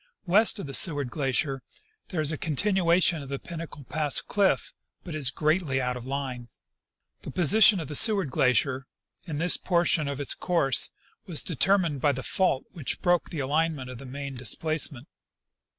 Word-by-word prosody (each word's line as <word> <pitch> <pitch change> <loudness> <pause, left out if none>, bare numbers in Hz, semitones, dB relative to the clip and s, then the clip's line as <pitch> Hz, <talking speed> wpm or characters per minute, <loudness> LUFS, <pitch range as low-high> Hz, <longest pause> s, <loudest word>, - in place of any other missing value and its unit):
West 210 +6 +4
of 200 - -6
the 135 - -8
Seward 145 -5 +2
glacier 135 0 -1 0.5
there 175 -4 -3
is 155 0 +3
a - - -2
continuation 175 0 +1
of 140 - -10
the 140 - -3
Pin 170 +3 -9
nacle 160 -3 -9
pass 150 -2 +1
cliff, 200 -2 0 0.3
but 175 - -8
it 155 - -4
is 135 -4 +4
greatly 155 -1 0
out 125 -1 -2
of 125 0 -9
line. 130 -3 -5 0.7
The - - -8
position 195 +4 +5
of 160 - -6
the 150 - -7
ScAvard 195 - +4
glacier, 130 +2 +1 0.4
in 155 -3 -4
this 170 +3 +2
portion 170 -4 +1
of 140 0 -4
its 140 - -4
course, 155 -8 +2 0.4
was 170 -5 +1
determined 170 -2 +1
by 145 -2 +2
the 130 0 -6
fault 180 -8 0
Avhich 155 -7 -4
broke 175 -1 +1
the 155 - -4
alignment 145 -1 -1
of 125 - -10
the 135 - -10
main 140 +1 -7
displacement. 135 - -1
150 Hz, 180 wpm, -26 LUFS, 135-170 Hz, 0.7 s, position